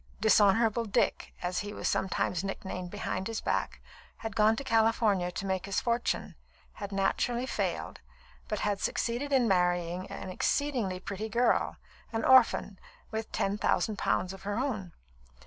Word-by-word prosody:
"Dishonourable 220 +2 +4
Dick," 205 - 0
as 180 +1 -1
he 205 0 -5
was - - -2
sometimes 185 -1 0
nicknamed 190 -2 -5
behind 190 -1 -3
his 225 -1 -3
back, - - -1 0.4
had 225 -3 -6
gone 215 0 +4
to 275 - -5
California 225 -6 +2
to 195 - -5
make 190 0 -1
his 200 - 0
fortune, 235 0 -1 0.4
had 200 -1 -7
naturally 235 +5 0
failed, - - -3 0.5
but 210 - -2
had 205 -1 0
succeeded 245 +5 -1
in 260 -4 +4
marrying 180 -1 +1
an 185 - -6
exceedingly 230 -4 0
pretty 200 +3 -5
girl, 240 +3 +2 0.4
an 225 -1 -1
orphan, 240 -6 +5 0.3
with 220 0 -4
ten 200 +1 -1
thousand 210 -1 +1
pounds 185 0 0
of 195 - -11
her 205 +1 -3
own. 220 -9 -2
205 Hz, 150 wpm, -30 LUFS, 190-230 Hz, 0.5 s, orphan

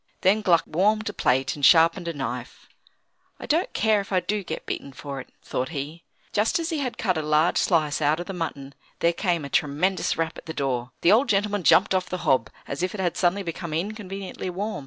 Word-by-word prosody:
Then 205 +3 +4
Gluck 175 -5 +4
warmed 210 +6 +1
a - - -6
plate 130 +1 +1
and 145 - -10
sharpened 165 +3 +5
a 170 - -2
knife. 125 -3 -6 0.7
"I - - -7
don't 330 +5 +1
care 215 -1 +2
if 195 - -11
I 185 - +3
do 210 +2 -2
get 160 - -6
beaten 140 - -5
for 140 +1 -6
it," - - -15
thought 130 +1 -3
he. 155 +2 -6 0.3
Just 210 +1 +2
as 335 0 -2
he 320 - -1
had 250 -5 -3
cut 185 -6 0
a - - -1
large 155 +2 +2
slice 155 -4 +1
out 150 +2 +2
of 175 - -4
the 195 - -6
mutton, 140 -6 -5 0.2
there 170 0 +2
came 170 -5 -1
a - - -4
tremendous 155 +8 0
rap 165 0 -2
at - - -16
the 160 - -5
door. 130 -3 -2
The 170 - +5
old 240 +7 +4
gentleman 205 0 +1
jumped 190 +3 +5
off 185 -1 0
the 185 - -2
hob, 125 -4 +3 0.2
as 140 - -4
if 185 +2 -1
it - - -7
had 180 -3 0
suddenly 190 +2 +1
become 165 -2 -5
inconveniently 195 0 -4
warm. 200 0 -3
175 Hz, 225 wpm, -25 LUFS, 150-200 Hz, 0.7 s, sharpened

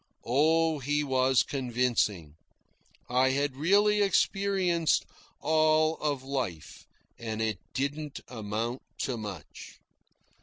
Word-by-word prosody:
Oh, 160 +4 +2
he 145 +2 0
was 130 -2 +3
convincing. 120 - -1 0.7
I 130 +2 +3
had 140 0 0
really 205 +8 +3
experienced 195 -4 +2 0.4
all 155 +1 +3
of 145 -3 -2
life, 120 - -5 0.3
and 110 -2 -4
it 110 -4 -1 0.2
didn't 145 +2 -3
amount 115 +1 -4 0.2
to 130 - -1
much. 105 -8 -9
135 Hz, 100 wpm, -29 LUFS, 120-155 Hz, 0.7 s, was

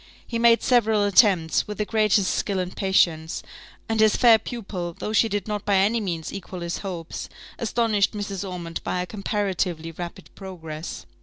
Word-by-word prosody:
He 230 - -3
made 235 0 +5
several 220 -4 +3
attempts, 195 -5 +4
with 210 -1 -6
the 210 - -1
greatest 210 -3 +2
skill 200 -2 -1
and 180 0 -3
patience; 170 -4 +1 0.4
and 225 -1 -1
his 215 -1 +5
fair 230 -2 +6
pupil, 195 -7 -5
though 215 - -4
she 225 +1 +4
did 205 -1 -2
not 210 -1 -3
by 200 - +2
any 210 +4 +3
means 170 -5 -4
equal 185 -2 -7
his 170 0 -3
hopes, 175 -4 -6 0.3
astonished 225 -3 +1
Mrs. 205 -2 -4
Ormond 170 -2 -6
by 180 - -1
her - - -2
comparatively 190 -5 -2
rapid 175 +3 -8
progress. 165 -5 -7
195 Hz, 170 wpm, -24 LUFS, 175-215 Hz, 0.4 s, fair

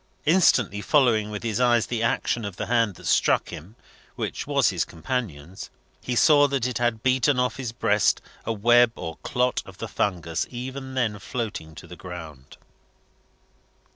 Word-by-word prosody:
Instantly 125 - +3
following 115 -6 +3
with 105 +1 -6
his 115 -1 -2
eyes 120 -2 +3
the 120 -2 -3
action 115 0 0
of 100 -3 -5
the - - -4
hand 115 -5 +1
that - - -14
struck - - +2
him 90 +9 -10 0.4
which - - -4
was - - +3
his - - 0
companion's 90 - -5 0.3
he 125 - -3
saw 145 +3 +5
that 135 -4 -1
it 125 -2 -2
had 120 -2 0
beaten 130 +1 +2
off 125 0 0
his 130 -4 -4
breast 105 -3 +2 0.2
a 115 - -2
web 120 +2 +4
or 80 0 -6
clot 125 0 -1
of - - -14
the - - -5
fungus 85 -5 -2
even 130 +2 -7
then 110 -5 -1
floating 100 -8 -5
to 80 - -11
the 90 - -11
ground. 80 -7 -10
115 Hz, 170 wpm, -24 LUFS, 100-125 Hz, 0.4 s, saw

